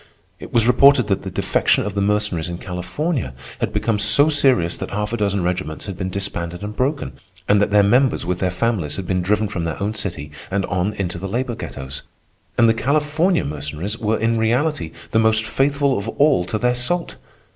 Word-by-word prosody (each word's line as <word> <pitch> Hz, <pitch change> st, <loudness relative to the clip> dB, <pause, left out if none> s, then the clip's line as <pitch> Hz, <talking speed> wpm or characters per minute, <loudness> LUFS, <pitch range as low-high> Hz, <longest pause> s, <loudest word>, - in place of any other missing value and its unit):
It -, -, -10 dB
was 115 Hz, -2 st, +3 dB
reported 125 Hz, -1 st, +5 dB
that 95 Hz, -, +1 dB
the -, -, -5 dB
defection -, -, +1 dB
of 105 Hz, -, -3 dB
the 100 Hz, -, -1 dB
Mercenaries 100 Hz, -5 st, 0 dB
in 85 Hz, -, -4 dB
California 90 Hz, -, -3 dB, 0.2 s
had -, -, -1 dB
become 110 Hz, -3 st, 0 dB
so 140 Hz, +9 st, +5 dB
serious 130 Hz, -, +3 dB
that -, -, -5 dB
half 105 Hz, +2 st, -3 dB
a -, -, 0 dB
dozen 100 Hz, -3 st, 0 dB
regiments 90 Hz, -3 st, -3 dB
had 100 Hz, -, -5 dB
been 95 Hz, 0 st, -3 dB
disbanded 90 Hz, -2 st, -4 dB
and 105 Hz, +1 st, -5 dB
broken, 140 Hz, +4 st, -1 dB, 0.4 s
and 100 Hz, 0 st, +4 dB
that 105 Hz, -, +2 dB
their 105 Hz, 0 st, +5 dB
members 125 Hz, +1 st, +3 dB
with 90 Hz, 0 st, -2 dB
their 95 Hz, -, +1 dB
families 90 Hz, -4 st, -1 dB
had 95 Hz, -, -5 dB
been 90 Hz, +1 st, 0 dB
driven 105 Hz, +4 st, +1 dB
from 95 Hz, -4 st, -4 dB
their 85 Hz, -2 st, -3 dB
own 105 Hz, +2 st, -1 dB
city 90 Hz, -9 st, -5 dB, 0.2 s
and 100 Hz, 0 st, 0 dB
on 95 Hz, +2 st, -1 dB
into 90 Hz, -4 st, -3 dB
the 95 Hz, -, -4 dB
labor 120 Hz, +4 st, -2 dB
ghettos. 70 Hz, -, -6 dB, 0.6 s
And 115 Hz, -, +5 dB
the 115 Hz, -, +5 dB
California 150 Hz, -, +1 dB
Mercenaries 75 Hz, +8 st, -4 dB
were 110 Hz, 0 st, 0 dB
in 115 Hz, +1 st, +1 dB
reality 120 Hz, -, 0 dB, 0.2 s
the 110 Hz, -, +3 dB
most 110 Hz, 0 st, +3 dB
faithful 140 Hz, +3 st, +1 dB
of 100 Hz, +3 st, -3 dB
all 140 Hz, -8 st, +3 dB
to 110 Hz, -, -2 dB
their 125 Hz, +3 st, +1 dB
salt! 145 Hz, +8 st, -2 dB
105 Hz, 205 wpm, -20 LUFS, 90-125 Hz, 0.6 s, reported